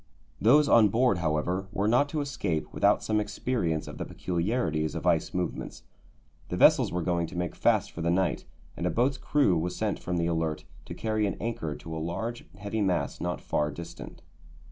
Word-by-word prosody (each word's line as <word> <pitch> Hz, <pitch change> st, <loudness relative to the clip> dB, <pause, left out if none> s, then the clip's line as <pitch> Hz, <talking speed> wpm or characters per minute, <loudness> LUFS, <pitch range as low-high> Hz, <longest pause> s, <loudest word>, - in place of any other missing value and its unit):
Those 145 Hz, +7 st, +6 dB
on 115 Hz, -5 st, +6 dB
board, 115 Hz, -3 st, +2 dB
however, 85 Hz, +4 st, -1 dB
were 100 Hz, +2 st, 0 dB
not 125 Hz, +6 st, +3 dB
to 155 Hz, -1 st, -1 dB
escape 100 Hz, -, -3 dB
without -, -, +3 dB
some 110 Hz, -1 st, +1 dB
experience 105 Hz, -6 st, -1 dB
of -, -, -8 dB
the -, -, -3 dB
peculiarities 85 Hz, -4 st, -1 dB
of 80 Hz, -, -4 dB
ice 85 Hz, -3 st, +2 dB
movements. 90 Hz, -1 st, -4 dB, 0.7 s
The -, -, -2 dB
vessels -, -, +5 dB
were 90 Hz, 0 st, -1 dB
going 85 Hz, -1 st, 0 dB
to 90 Hz, -, -8 dB
make 90 Hz, -1 st, -2 dB
fast -, -, +2 dB
for 85 Hz, -, -7 dB
the 85 Hz, -, 0 dB
night, 90 Hz, 0 st, +1 dB, 0.3 s
and -, -, -2 dB
a -, -, +2 dB
boat's 130 Hz, +3 st, +1 dB
crew 140 Hz, -11 st, +2 dB
was 90 Hz, +3 st, -2 dB
sent -, -, -1 dB
from 90 Hz, -1 st, -3 dB
the 85 Hz, -, +1 dB
Alert 80 Hz, -2 st, -1 dB, 0.2 s
to -, -, -7 dB
carry 110 Hz, -1 st, 0 dB
an 100 Hz, -, -3 dB
anchor 90 Hz, -10 st, -3 dB
to 80 Hz, +2 st, -8 dB
a -, -, -3 dB
large, 110 Hz, +9 st, -4 dB
heavy 105 Hz, +2 st, -3 dB
mass 90 Hz, -7 st, 0 dB
not 90 Hz, -1 st, -2 dB
far 75 Hz, 0 st, 0 dB
distant. 85 Hz, +3 st, -9 dB
90 Hz, 195 wpm, -28 LUFS, 85-110 Hz, 0.7 s, Those